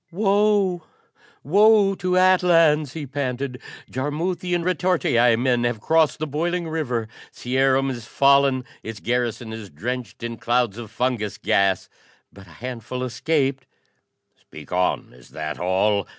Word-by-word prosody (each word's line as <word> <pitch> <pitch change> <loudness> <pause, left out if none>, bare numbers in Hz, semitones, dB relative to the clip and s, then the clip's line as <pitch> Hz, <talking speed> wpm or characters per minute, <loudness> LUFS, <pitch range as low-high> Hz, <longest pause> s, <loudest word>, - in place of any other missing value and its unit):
"Woe, 200 -2 +2 0.6
woe 205 +4 +5
to 185 -1 -1
Atlans!" 165 -6 +4
he 155 -3 -5
panted. 130 -1 -4 0.3
"Jarmuthian 170 +6 -2
retortii 170 -10 +2
men 120 0 +1
have 120 -2 -1
crossed 160 +5 +2
the 155 - -3
boiling 170 +4 -2
river. 125 -8 -2 0.2
Cierum 135 +1 +1
is 120 -3 -7
fallen! 140 -1 +3 0.2
Its 110 -1 -7
garrison 120 -2 -2
is 110 -3 -8
drenched 115 +7 -5
in 115 0 -4
clouds 120 -3 0
of 115 -3 -8
fungus 115 -2 -2
gas. 95 -2 +1 0.5
But 100 -1 -14
a 85 - -16
handful 125 0 -5
escaped!" 135 +1 -1 0.7
"Speak - - -14
on: 90 0 -1
is 60 -1 -18
that 75 -1 -5
all?" 95 +3 +1
130 Hz, 130 wpm, -23 LUFS, 115-165 Hz, 0.7 s, woe